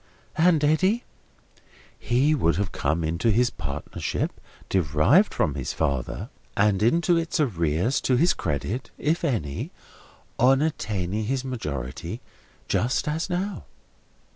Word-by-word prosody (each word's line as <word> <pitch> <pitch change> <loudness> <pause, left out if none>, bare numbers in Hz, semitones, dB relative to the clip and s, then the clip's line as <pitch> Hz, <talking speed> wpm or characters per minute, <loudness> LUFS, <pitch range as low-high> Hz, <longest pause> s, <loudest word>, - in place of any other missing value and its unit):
"And 165 -2 +4
Eddy?" 185 +10 +3 1.0
"He 130 +5 +2
would 85 - +2
have 100 +2 -1
come 80 +4 -1
into 85 +8 0
his 120 +3 +3
partnership 70 +1 -4 0.3
derived 95 - +3
from 75 - 0
his 65 -3 -3
father, 70 -5 -2 0.3
and 100 -1 +3
into 170 +9 +3
its 165 -1 -1
arrears 90 - +1
to 130 - +2
his 170 +8 +4
credit 90 - -3
(if 160 +4 0
any), 75 - -1 0.7
on 130 +3 +5
attaining 110 - -2
his 130 +3 -1
majority, 75 - -4 0.5
just 125 +6 0
as 160 +4 -1
now." 190 +3 -3
115 Hz, 120 wpm, -25 LUFS, -, 1.0 s, on